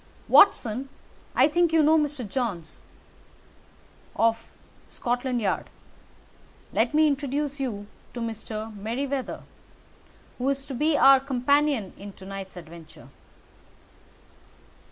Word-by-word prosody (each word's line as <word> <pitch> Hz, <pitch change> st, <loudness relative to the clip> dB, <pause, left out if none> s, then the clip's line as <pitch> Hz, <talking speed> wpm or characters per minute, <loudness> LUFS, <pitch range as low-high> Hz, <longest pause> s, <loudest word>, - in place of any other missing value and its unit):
"Watson, 260 Hz, -, +4 dB, 0.5 s
I 265 Hz, -, +6 dB
think 345 Hz, +2 st, +2 dB
you 325 Hz, -1 st, +4 dB
know 310 Hz, +2 st, +5 dB
Mr. 295 Hz, -6 st, -1 dB
Jones, 200 Hz, -9 st, -4 dB, 1.3 s
of 230 Hz, 0 st, 0 dB, 0.3 s
Scotland 245 Hz, +1 st, -2 dB
Yard? 210 Hz, -, -1 dB, 1.0 s
Let 235 Hz, +6 st, +1 dB
me 310 Hz, 0 st, +5 dB
introduce 285 Hz, 0 st, -2 dB
you 220 Hz, -7 st, -3 dB, 0.3 s
to -, -, -4 dB
Mr. 220 Hz, -1 st, -5 dB
Merryweather, 255 Hz, +6 st, -4 dB, 1.0 s
who 255 Hz, +2 st, 0 dB
is 275 Hz, 0 st, -1 dB
to 275 Hz, -, -7 dB
be 300 Hz, +4 st, +1 dB
our 270 Hz, 0 st, +7 dB
companion 270 Hz, -3 st, +1 dB
in 200 Hz, 0 st, -9 dB
to 190 Hz, -, -13 dB
night's 195 Hz, -1 st, -8 dB
adventure." 165 Hz, -1 st, -13 dB
255 Hz, 110 wpm, -26 LUFS, 215-280 Hz, 1.3 s, our